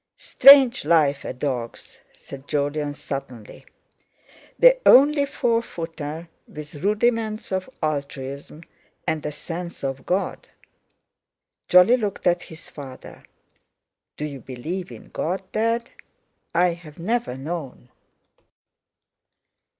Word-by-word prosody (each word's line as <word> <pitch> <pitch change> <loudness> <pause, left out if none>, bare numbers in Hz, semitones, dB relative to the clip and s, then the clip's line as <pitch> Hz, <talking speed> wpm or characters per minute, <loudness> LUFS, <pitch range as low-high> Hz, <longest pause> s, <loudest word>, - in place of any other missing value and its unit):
"Strange 275 -3 +7
life 150 -3 +2
a - - -4
dog's," 125 -3 -5
said 135 0 -12
Jolyon 145 0 -1
suddenly: 125 -7 -8 0.9
"The - - +6
only 285 +2 +6
four 235 -4 0
footer 165 -4 -7 0.2
with 150 -1 -10
rudiments 215 +1 0
of 190 +4 -2
altruism 140 0 -4 0.4
and 160 -2 -1
a - - -3
sense 170 +3 -7
of 135 -1 -4
God!" 185 +2 -2 1.2
Jolly 180 +8 +6
looked 210 -5 -4
at 175 -1 +3
his 160 0 -12
father. 135 -3 -11 0.9
"Do 150 - -3
you 140 -3 -7
believe 160 +10 -6
in - - -12
God, 185 +4 -3
Dad? 230 +2 -1 0.6
I've 170 -3 0
never 215 - -2
known." 135 -4 -6
165 Hz, 105 wpm, -23 LUFS, 145-210 Hz, 1.2 s, Strange